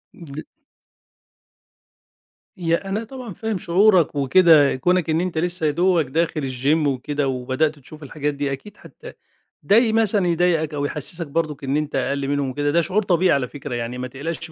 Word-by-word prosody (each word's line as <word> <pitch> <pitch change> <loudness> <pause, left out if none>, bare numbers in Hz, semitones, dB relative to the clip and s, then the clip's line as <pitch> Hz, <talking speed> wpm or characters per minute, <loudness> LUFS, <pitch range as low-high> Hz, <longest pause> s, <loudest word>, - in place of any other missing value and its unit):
ل 155 -3 -9 2.1
يا 170 +2 -1
أنا 215 +4 -2
طبعًا 245 -3 -9
فاهم 220 -1 -3
شعورك 180 -3 +3
وكده، 145 +1 +5
كونك 175 +4 +1
إن 160 +2 +1
أنت 180 -3 -3
لسّه 175 0 -1
يا 150 - +3
دوبك 175 +1 +2
لسّه - - -14
داخل 160 -1 0
الgym 140 +4 0
وكده 140 +1 -2
وبدأت 135 +4 -1
تشوف 155 +3 -13
الحاجات 145 +1 -3
دي، 140 -1 -2
أكيد 170 +10 -7
هت - - -13 0.5
ده 205 - +3
ي 230 -1 +4
مثلًا 215 -4 +2
يضايقك 165 -3 +1
أو 145 0 -2
يحسِّسك 150 +3 -5
برضُك 150 -1 -3
إن 135 +2 0
أنت 150 -1 -3
أقَل 140 -1 -1
منهم 140 -1 -1
وكده، 145 +2 -1
ده 170 +2 +3
شعور 200 +5 0
طبيعي 180 -1 +2
على 130 -3 +1
فكرة، 140 -2 -7
يعني 120 +1 -4
ما 125 0 -4
تقلقش 160 +5 -6
155 Hz, 180 wpm, -21 LUFS, 140-180 Hz, 2.1 s, وكده